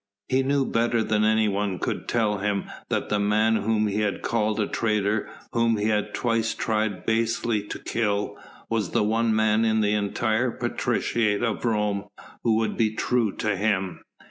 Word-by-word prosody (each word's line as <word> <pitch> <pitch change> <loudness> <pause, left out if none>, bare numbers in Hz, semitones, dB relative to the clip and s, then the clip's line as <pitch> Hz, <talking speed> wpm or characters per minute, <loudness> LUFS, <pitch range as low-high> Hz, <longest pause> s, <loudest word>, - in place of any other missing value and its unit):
He 130 0 +3
knew 140 0 +1
better 115 -1 +1
than 110 -1 +1
anyone 105 -3 +1
could - - -3
tell 105 -4 +1
him 100 0 0 0.3
that - - -1
the 105 - +1
man 110 +2 +3
whom 110 +1 +1
he 105 0 -1
had 105 -2 -1
called 110 -1 0
a 105 - +2
traitor, 105 -1 0 0.2
whom 115 -1 +2
he 105 +1 0
had 105 -1 0
twice 115 -2 0
tried 110 -3 -1
basely 115 -1 +1
to - - -5
kill, 105 -2 -1 0.3
was 110 -6 -1
the - - +3
one 110 +1 +1
man 110 0 +3
in 110 -1 +2
the 105 0 +2
entire 110 +3 0
patriciate 110 -2 0
of 115 -3 -1
Rome 105 -3 0 0.4
who 115 -2 +2
would 110 0 0
be 110 -1 +1
true 120 -2 +1
to 105 -2 -1
him. 95 -3 -1
110 Hz, 170 wpm, -25 LUFS, 105-115 Hz, 0.4 s, He